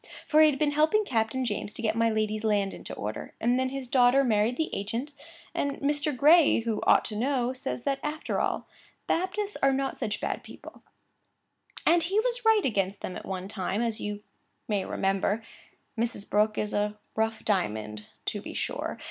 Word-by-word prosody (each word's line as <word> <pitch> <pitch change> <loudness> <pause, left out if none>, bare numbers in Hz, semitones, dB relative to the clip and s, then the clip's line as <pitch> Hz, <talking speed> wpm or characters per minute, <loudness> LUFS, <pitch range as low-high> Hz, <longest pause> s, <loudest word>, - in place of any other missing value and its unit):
For 310 0 +5
he 310 - +8
has 285 - -1
been 295 0 +2
helping 315 +9 +3
Captain 235 - 0
James 210 -2 -3
to - - -6
get 215 -1 +1
my 230 0 +3
lady's 215 0 -1
land 205 -3 +1
into - - -9
order; 105 +1 -5
and 245 +2 +2
then 260 0 +1
his 270 -1 -5
daughter 250 +2 +5
married 225 0 +2
the 320 - -1
agent; 230 +9 -3 0.4
and 280 0 -1
Mr. 290 -1 0
Gray 300 -1 +6
(who 225 -2 -2
ought - - +5
to 215 - -5
know) 250 +2 0
says 255 -1 -4
that, 275 -1 0
after 300 +1 -2
all, - - -1 0.4
Baptists 395 +4 -1
are 275 - +3
not 270 0 -1
such 210 - -2
bad - - -2
people; - - -12 1.0
and 345 0 +5
he 380 +6 +1
was - - -1
right 445 -2 +4
against 200 -5 0
them 180 - -5
at - - -8
one 190 -1 -4
time, 200 +2 -2
as 230 -2 -2
you 210 0 -4 0.4
may 205 -3 0
remember. 195 +3 0 0.5
Mrs. 230 -3 -1
Brooke 210 +1 +2
is 210 - -1
a 210 0 0 0.2
rough 220 0 -1
diamond, 105 - -1 0.2
to - - -2
be - - -8
sure. - - -3
235 Hz, 190 wpm, -28 LUFS, 210-285 Hz, 1.0 s, he